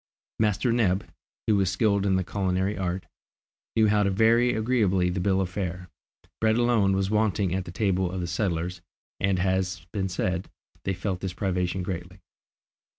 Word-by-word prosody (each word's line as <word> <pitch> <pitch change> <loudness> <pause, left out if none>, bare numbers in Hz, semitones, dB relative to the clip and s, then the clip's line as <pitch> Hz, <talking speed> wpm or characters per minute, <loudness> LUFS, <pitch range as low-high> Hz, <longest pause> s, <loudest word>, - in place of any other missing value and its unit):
Master 110 +3 +2
Neb, 100 -5 +2 0.4
who 105 -2 +3
was 95 -2 +2
skilled 100 +1 +2
in 95 - +3
the 95 - +1
culinary 95 +1 -1
art, 90 0 -2 0.7
knew 110 -1 +5
how 105 0 +3
to 100 - +2
vary 115 +5 +4
agreeably 105 -6 +2
the 90 - -2
bill 95 +1 +2
of 95 - +1
fare. 90 -2 -4 0.5
Bread 110 0 +3
alone 115 -5 +3
was 95 +1 0
wanting 105 -4 +1
at 95 -1 -1
the 85 - -7
table 95 -1 +1
of 95 - -4
the 90 - -2
settlers, 85 -1 -2 0.4
and 95 -2 +1
as - - +1 0.3
has 85 - -19
been 95 -2 -1
said, 90 0 -2 0.4
they 95 - 0
felt 95 0 -3
this 95 -2 -4
privation 90 -1 -1
greatly. 90 0 -5
95 Hz, 175 wpm, -26 LUFS, 90-105 Hz, 0.7 s, knew